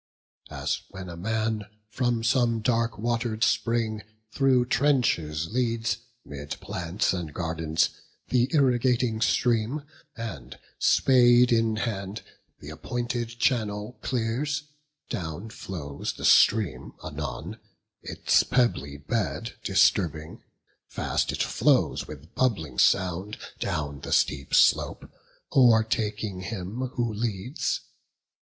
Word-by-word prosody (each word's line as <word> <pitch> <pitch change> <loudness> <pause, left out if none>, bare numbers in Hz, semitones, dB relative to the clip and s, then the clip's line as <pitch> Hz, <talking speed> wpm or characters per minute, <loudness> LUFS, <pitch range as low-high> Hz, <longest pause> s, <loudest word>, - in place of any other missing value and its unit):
As - - -2
when 95 -2 -8
a 85 - -7
man 110 +3 -1 0.3
From 120 -2 0
some 115 -2 +2
dark 115 -1 +1
water'd 115 0 -1
spring 115 -2 +1 0.3
through 130 -3 +3
trenches 85 - +1
leads, 115 -1 0 0.3
'Mid 70 0 -7
plants 90 +4 -1
and 85 -4 -4
gardens, 80 -1 0 0.4
th' 125 0 +2
irrigating 125 -5 +2
stream, 120 +5 +1 0.3
And, 75 - -7 0.2
spade 125 -2 +5
in 115 -1 +2
hand, 105 -2 -3 0.4
th' 75 - -7
appointed 120 +8 -3
channel 110 -2 0
clears: 130 +5 -1 0.5
Down 85 +4 -5
flows 75 -10 -5
the - - -6
stream 100 - +4
anon, - - -5 0.4
its - - +2
pebbly 95 - 0
bed 115 - -2
Disturbing; 85 -5 +2 0.5
fast - - -1
it - - 0
flows - - +2
with 75 +2 -11
bubbling 80 - 0
sound, 95 +3 +2 0.2
Down 70 -2 -3
the - - -7
steep 70 -3 +1
slope, - - +3 0.5
o'ertaking 110 -5 +3
him 110 +5 -4
who 120 -3 -1
leads. 110 +3 -2
110 Hz, 105 wpm, -26 LUFS, 90-120 Hz, 0.5 s, spade